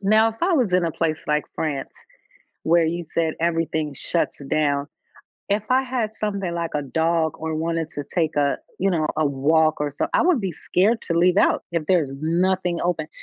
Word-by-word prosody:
Now, 215 Hz, +3 st, +4 dB
if 225 Hz, -, -6 dB
I 360 Hz, -, +3 dB
was 250 Hz, -, +2 dB
in 180 Hz, -1 st, +3 dB
a 165 Hz, -, -1 dB
place 160 Hz, -2 st, -2 dB
like 150 Hz, 0 st, +1 dB
France 145 Hz, -4 st, -3 dB, 0.7 s
where 170 Hz, 0 st, +4 dB
you 170 Hz, +1 st, -2 dB
said 160 Hz, 0 st, -1 dB
everything 160 Hz, -3 st, -1 dB
shuts 155 Hz, 0 st, -1 dB
down, 145 Hz, -1 st, 0 dB, 0.6 s
if 205 Hz, +1 st, 0 dB
I 260 Hz, +1 st, +4 dB
had 245 Hz, -4 st, -2 dB
something 200 Hz, -5 st, -3 dB
like 170 Hz, -1 st, -2 dB
a 145 Hz, -, -1 dB
dog 160 Hz, +2 st, +1 dB
or 160 Hz, 0 st, -3 dB
wanted 165 Hz, 0 st, -2 dB
to 145 Hz, -, -5 dB
take 160 Hz, -4 st, 0 dB
a, 145 Hz, -1 st, +2 dB, 0.2 s
you 195 Hz, -, +1 dB
know, 160 Hz, -5 st, +1 dB
a 155 Hz, -1 st, +2 dB
walk 155 Hz, +3 st, +2 dB
or 150 Hz, -, 0 dB
somet 140 Hz, -, -3 dB
I -, -, +4 dB
would 340 Hz, -7 st, +3 dB
be 190 Hz, -3 st, -2 dB
scared 205 Hz, +8 st, +1 dB
to 170 Hz, -1 st, -1 dB
leave 180 Hz, +2 st, +4 dB
out -, -, +3 dB
if 165 Hz, -3 st, -1 dB
there's 155 Hz, -7 st, +2 dB
nothing 180 Hz, +2 st, +1 dB
open, 160 Hz, -3 st, -1 dB
165 Hz, 200 wpm, -23 LUFS, 155-190 Hz, 0.7 s, Now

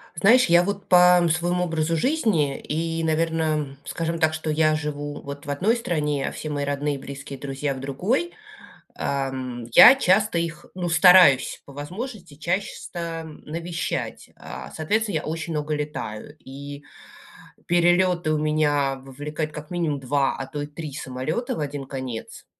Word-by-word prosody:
Знаешь, 230 Hz, +9 st, +5 dB
я 170 Hz, +1 st, +5 dB
вот 200 Hz, +1 st, -4 dB
по 180 Hz, -1 st, +6 dB
своему 175 Hz, +1 st, 0 dB
образу 165 Hz, -1 st, 0 dB
жизни 195 Hz, -, +1 dB
и, 165 Hz, +1 st, -2 dB
наверно, 160 Hz, -3 st, 0 dB
скажем 165 Hz, 0 st, -3 dB
так, 160 Hz, -1 st, +2 dB
что 155 Hz, 0 st, -3 dB
я 155 Hz, 0 st, +3 dB
живу 145 Hz, -1 st, -4 dB
вот 140 Hz, 0 st, -8 dB
в -, -, -5 dB
одной 190 Hz, +11 st, +2 dB
стране, 150 Hz, -, -1 dB
а -, -, -2 dB
все 155 Hz, -, -6 dB
мои 145 Hz, -1 st, -2 dB
родные, 145 Hz, 0 st, -2 dB
близкие, 135 Hz, 0 st, -8 dB
друзья- 140 Hz, 0 st, -3 dB
в 130 Hz, -, -8 dB
другой. 190 Hz, -, -1 dB, 0.6 s
Ам, 130 Hz, -3 st, -3 dB
я 255 Hz, -, +10 dB
часто 210 Hz, -5 st, +2 dB
их, 165 Hz, -1 st, -3 dB
ну, 180 Hz, -1 st, -2 dB
стараюсь, 175 Hz, -5 st, +6 dB
по 140 Hz, -, -13 dB
возможности, 180 Hz, -, -7 dB
чаще 175 Hz, +6 st, -2 dB
ста 165 Hz, -2 st, -6 dB
навещать. 165 Hz, +2 st, -5 dB
А, 65 Hz, +1 st, -9 dB
соответственно, 205 Hz, +5 st, 0 dB
я 155 Hz, -, -1 dB
очень 165 Hz, +1 st, -4 dB
много 150 Hz, 0 st, -2 dB
летаю, 145 Hz, -3 st, -5 dB
и 140 Hz, +2 st, -9 dB, 0.8 s
перелеты 175 Hz, -1 st, +3 dB
у 155 Hz, -, +1 dB
меня 150 Hz, -3 st, +1 dB
вовлекают, 150 Hz, +3 st, -5 dB
как 150 Hz, 0 st, -9 dB
минимум, 165 Hz, -5 st, -1 dB
2, 135 Hz, +1 st, 0 dB
а 135 Hz, -, -5 dB
то 145 Hz, +2 st, -5 dB
и -, -, -4 dB
3 150 Hz, 0 st, -8 dB
самолета 130 Hz, -, -3 dB
в -, -, -4 dB
1 145 Hz, -1 st, -4 dB
конец. 130 Hz, -4 st, -6 dB
155 Hz, 155 wpm, -24 LUFS, 140-175 Hz, 0.8 s, я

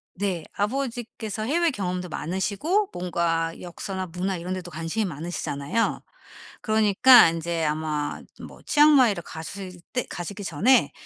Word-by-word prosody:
네. 180 Hz, -4 st, -2 dB
아버지께서 230 Hz, -2 st, -3 dB
해외 335 Hz, +8 st, +2 dB
경험도 180 Hz, -, -3 dB
많으시고 200 Hz, -, -1 dB
뭔가 170 Hz, -2 st, -1 dB
역사나 185 Hz, +2 st, -5 dB
문화 180 Hz, +3 st, -2 dB
이런 180 Hz, +2 st, -4 dB
데도 180 Hz, -2 st, -6 dB
관심이 165 Hz, +7 st, -2 dB
많으시잖아요. 165 Hz, +3 st, -2 dB, 0.6 s
그러니까 220 Hz, +1 st, +6 dB
인제 165 Hz, 0 st, -2 dB
아마 150 Hz, -1 st, -2 dB, 0.3 s
뭐 -, -, -15 dB
치앙마이를 270 Hz, -, +5 dB
가실 180 Hz, +3 st, -8 dB
때 250 Hz, -, -1 dB
가시기 200 Hz, +4 st, -6 dB
전에 215 Hz, -, +3 dB
185 Hz, 310 characters per minute, -25 LUFS, 170-225 Hz, 0.6 s, 그러니까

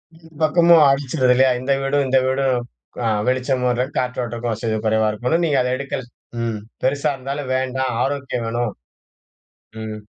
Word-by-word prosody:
இந்த 165 Hz, 0 st, -18 dB
பக்கமும் 170 Hz, 0 st, +6 dB
அடிச்சிருது 130 Hz, -2 st, +2 dB
இல்லையா? 130 Hz, +1 st, +4 dB
இந்த 130 Hz, +2 st, -2 dB
வீடும் 140 Hz, +1 st, +1 dB
இந்த 130 Hz, -, +3 dB
வீடும் 130 Hz, 0 st, +1 dB, 0.5 s
அ -, -, +2 dB, 0.2 s
வெளிச்சம் 130 Hz, 0 st, 0 dB, 0.3 s
காற்றோட்டமும் 120 Hz, -2 st, -2 dB
வசதி 110 Hz, 0 st, -2 dB
குறைவா 110 Hz, 0 st, +2 dB
இருக்கவும், 125 Hz, +11 st, 0 dB
நீங்க 145 Hz, -4 st, +2 dB
அத 125 Hz, -, 0 dB
எடுக்கல. 140 Hz, -1 st, -4 dB, 0.4 s
ம். 115 Hz, -2 st, -2 dB, 0.2 s
பெருசா 140 Hz, +3 st, +1 dB
இருந்தாலும் 135 Hz, +1 st, -5 dB
வேண்டாம். 130 Hz, 0 st, -1 dB
ஆரோக்கியம் 135 Hz, -4 st, -2 dB
வேணும். 120 Hz, -1 st, -1 dB, 1.1 s
ம். 110 Hz, -1 st, -5 dB
130 Hz, 145 wpm, -21 LUFS, 120-140 Hz, 1.1 s, பக்கமும்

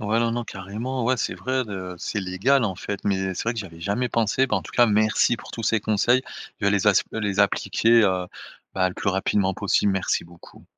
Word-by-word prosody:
Ouais, 110 Hz, +1 st, 0 dB
non, 115 Hz, 0 st, +1 dB
non, 120 Hz, +1 st, -2 dB
carrément. 115 Hz, +5 st, -5 dB
Ouais, 130 Hz, +2 st, +2 dB
c'est 110 Hz, -, -2 dB
vrai, 130 Hz, 0 st, -1 dB
heu, 95 Hz, -2 st, -6 dB
c'est 95 Hz, -, -3 dB
légal, 100 Hz, +9 st, +1 dB
en 95 Hz, -4 st, -1 dB
fait, 100 Hz, +2 st, -5 dB
mais 95 Hz, -1 st, 0 dB
c'est -, -, -4 dB
vrai 115 Hz, -, 0 dB
que 115 Hz, -, -4 dB
j'y -, -, -6 dB
avais 85 Hz, -2 st, -14 dB
jamais 105 Hz, +8 st, -1 dB
pensé. 115 Hz, +3 st, +1 dB
Bah, -, -, +1 dB
en -, -, -3 dB
tout -, -, -11 dB
cas, 120 Hz, -, +5 dB
merci 110 Hz, +2 st, +2 dB
pour -, -, -12 dB
tous 115 Hz, -, -5 dB
ces 110 Hz, -, +2 dB
conseils. 110 Hz, +4 st, +2 dB, 0.4 s
Je -, -, -2 dB
vais -, -, +4 dB
les 100 Hz, 0 st, +3 dB
as 100 Hz, -, +4 dB
les 105 Hz, -3 st, -2 dB
appliquer, 115 Hz, +3 st, +3 dB
heu, 95 Hz, -3 st, +1 dB, 0.5 s
bah, 95 Hz, -1 st, +2 dB
le 90 Hz, -, -8 dB
plus -, -, -2 dB
rapidement 95 Hz, 0 st, +1 dB
possible, 100 Hz, 0 st, +1 dB
merci 95 Hz, -1 st, -1 dB
beaucoup. 85 Hz, 0 st, -16 dB
105 Hz, 240 wpm, -24 LUFS, 95-115 Hz, 0.5 s, cas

